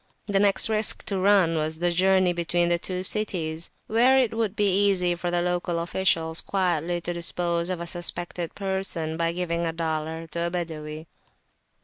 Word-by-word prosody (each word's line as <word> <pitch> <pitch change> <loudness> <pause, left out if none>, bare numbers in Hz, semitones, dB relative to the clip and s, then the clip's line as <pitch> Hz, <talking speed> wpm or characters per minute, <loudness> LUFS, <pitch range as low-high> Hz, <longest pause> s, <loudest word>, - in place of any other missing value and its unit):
The 200 -1 +1
next 200 +2 +4
risk 220 -1 +3
to - - -3
be 190 - -1
run 190 -4 +4
was 155 0 -2
the 175 +1 +1
journey 185 0 +3
between 175 0 0
the 170 0 +1
two 185 +1 -3
cities, 170 -6 0 0.2
where 245 +4 +4
it 250 -4 +2
would 220 -3 -1
be 205 -1 +2
easy 180 -3 +2
for 175 +1 -4
the 175 0 0
local 175 -1 -1
officials 165 -1 0
quietly 175 -3 -1
to 175 +1 -3
dispose 170 0 -1
of 185 -2 -3
a 170 - -5
suspected 175 0 -3
person 190 -5 -2
by 165 0 0
giving 170 -1 -2
a 165 - -1
dollar 160 0 -3
to 170 0 -2
a - - -2
Badawi. 160 -3 -5
175 Hz, 180 wpm, -25 LUFS, 165-190 Hz, 0.2 s, next